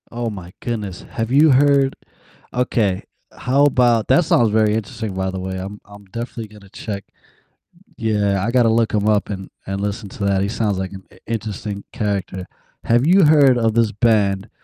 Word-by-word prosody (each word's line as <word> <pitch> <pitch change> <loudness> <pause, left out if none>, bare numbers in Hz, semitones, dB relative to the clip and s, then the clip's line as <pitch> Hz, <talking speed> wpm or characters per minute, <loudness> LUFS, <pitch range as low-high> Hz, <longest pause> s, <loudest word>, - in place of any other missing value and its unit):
Oh 120 -1 -3
my 95 -4 -9
goodness, 105 -6 -4
have 115 0 -3
you 150 +3 +6
heard 140 0 +4 0.6
Okay, 110 -6 0 0.3
how 140 +3 +2
about 120 -5 +3
That 175 - +4
song's 150 -9 +3
very 105 0 +2
interesting, 110 -1 -4
by 95 0 -2
the 95 - -5
way, 95 0 -4
I'm 100 +3 -7
I'm 100 0 -14
definitely 115 +2 -6
gonna 105 -2 -16
check 100 0 -6 0.9
Yeah, 105 -3 0
I 115 - 0
gotta 120 -2 +4
look 115 0 +1
him 105 0 +1
up, 105 -1 +2
and 95 -2 -6 0.2
and 95 0 -3
listen 100 0 -4
to 100 - -5
that, 100 -1 +2
he 100 - -1
sounds 105 -3 -1
like 95 -1 -4
an 95 -1 -10
i - - -19
interesting 105 -2 -4
character. 95 -3 -3 0.4
Have 120 +4 +2
you 190 +2 +6
heard 145 -4 +5
of 115 -2 +1
this 115 -1 +2
band? 100 -3 +1
110 Hz, 185 wpm, -20 LUFS, 100-120 Hz, 0.9 s, you